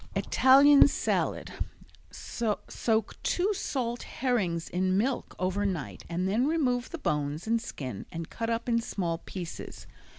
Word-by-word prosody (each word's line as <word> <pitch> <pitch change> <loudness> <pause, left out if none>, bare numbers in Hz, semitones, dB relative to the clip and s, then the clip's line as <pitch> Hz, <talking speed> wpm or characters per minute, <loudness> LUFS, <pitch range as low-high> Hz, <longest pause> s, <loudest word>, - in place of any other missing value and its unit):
Italian 275 +2 +7
Salad - - -1 0.6
Soak 220 -1 -2
two 385 +4 +1
salt 245 - -2
herrings 195 -11 -1
in 185 +1 +1
milk 250 +5 -1
over 185 +3 0
night 185 -8 -3
and 175 +2 -1
then 225 +7 +2
remove 255 -6 +1
the 340 - -5
bones 150 - -2
and 230 +1 +1
skin 130 - -6
and 165 -1 -5
cut 230 0 -3
up 230 +1 -1
in 230 -1 +2
small 170 -7 -2
pieces. 175 -1 -7
220 Hz, 135 wpm, -29 LUFS, 175-250 Hz, 0.6 s, Italian